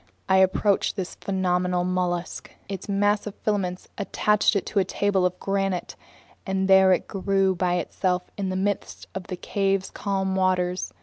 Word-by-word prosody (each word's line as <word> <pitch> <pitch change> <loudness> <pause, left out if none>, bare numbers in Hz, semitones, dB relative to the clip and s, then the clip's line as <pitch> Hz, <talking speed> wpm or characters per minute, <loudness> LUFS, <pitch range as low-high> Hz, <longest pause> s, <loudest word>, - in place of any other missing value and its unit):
I 190 - +4
approached 190 +1 +2
this 190 -3 -4
phenomenal 180 -2 0
mollusk. 180 -1 -2 0.2
Its 195 0 -6
mass 205 +1 +1
of 205 - -6
filaments 185 -4 -2
attached 210 +1 +2
it 200 - 0
to 205 - 0
a - - +4
table 190 0 +1
of 180 0 -8
granite, 195 -2 -1 0.5
and 190 -1 -1
there 190 -1 +6
it 185 - +1
grew 195 0 +1
by 180 0 0
itself 180 +1 -1
in 195 -2 -2
the 185 - -2
midst 200 +1 -2
of 190 -2 -6
the 185 - -5
cave's 195 0 -1
calm 190 -1 -1
waters. 185 -1 0
190 Hz, 165 wpm, -25 LUFS, 180-195 Hz, 0.5 s, there